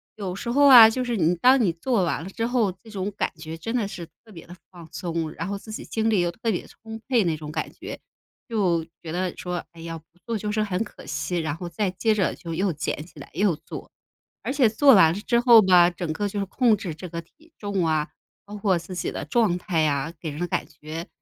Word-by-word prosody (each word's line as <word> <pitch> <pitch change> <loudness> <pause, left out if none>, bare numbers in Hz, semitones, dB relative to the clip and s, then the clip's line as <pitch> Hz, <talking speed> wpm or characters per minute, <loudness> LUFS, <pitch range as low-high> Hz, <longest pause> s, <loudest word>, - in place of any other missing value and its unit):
有 190 -4 -4
时 235 - -5
候 285 +3 +4
啊， 235 -4 +11
就 255 +3 -2
是 240 -1 -1
你 170 +1 +2
当 255 +9 +5
你 190 -7 +3
做 195 +4 0
完 165 - -1
了 185 - -7
之 225 +4 -3
后， 235 -6 +1
这 225 - -14
种 200 -1 -3
感 - - 0
觉 160 0 -8
真 225 +9 -4
的 225 -5 0
是 185 -4 -7 0.2
特 220 - -16
别 165 -3 -11
地 175 - -11 0.2
放 170 -3 -12
松， 165 -3 -3
然 - - -5
后 200 +1 -3
自 215 +2 -11
己 - - -6
精 220 0 -1
力 215 -3 +3
又 175 0 0
特 225 +5 -2
别 180 - -3
充 225 0 -10
沛 245 -4 +3
那 165 -3 0
种 150 -1 -8
感 - - -3
觉。 - - -8 0.5
就 185 -7 +1 0.2
觉 160 - -7
得 180 +1 -2
说， 180 -1 -4
哎 165 -1 -14
呀， 165 0 -6
不 160 - -16 0.2
做 230 -1 -1
就 210 0 -3
是 215 +1 0
很 200 -1 -1
可 210 - -13
惜， 180 - -3
然 155 -3 -2
后 175 +2 -6
再 190 +4 -1
接 215 +5 +1
着 200 -3 0
就 170 -2 -7
又 190 +3 0
捡 150 0 -3
起 165 - -19
来 - - -11
又 185 0 +2
做。 - - -9 0.5
而 - - -2
且 265 -5 +4
做 270 +5 +6
完 165 -6 +6
了 190 - -4
之 235 +2 +2
后 240 -2 +8
吧， 180 -3 +6
整 175 -2 -4
个 205 +6 -2
就 205 +1 -4
是 195 - -1
控 235 +3 +3
制 185 -5 -5
这 175 +3 -9
个 170 0 -5
体 315 - -26
重 200 -4 -1
啊， 155 -1 0 0.4
包 205 - -9
括 195 -3 +2
自 170 +2 -8
己 175 - -2
的 - - -5
状 190 +1 +2
态 170 -4 0
啊， 145 +2 -1
给 160 - -5
人 150 +1 -7
的 175 - 0
感 165 - -2
觉， 155 +2 -8
185 Hz, 275 characters per minute, -24 LUFS, 165-220 Hz, 0.5 s, 啊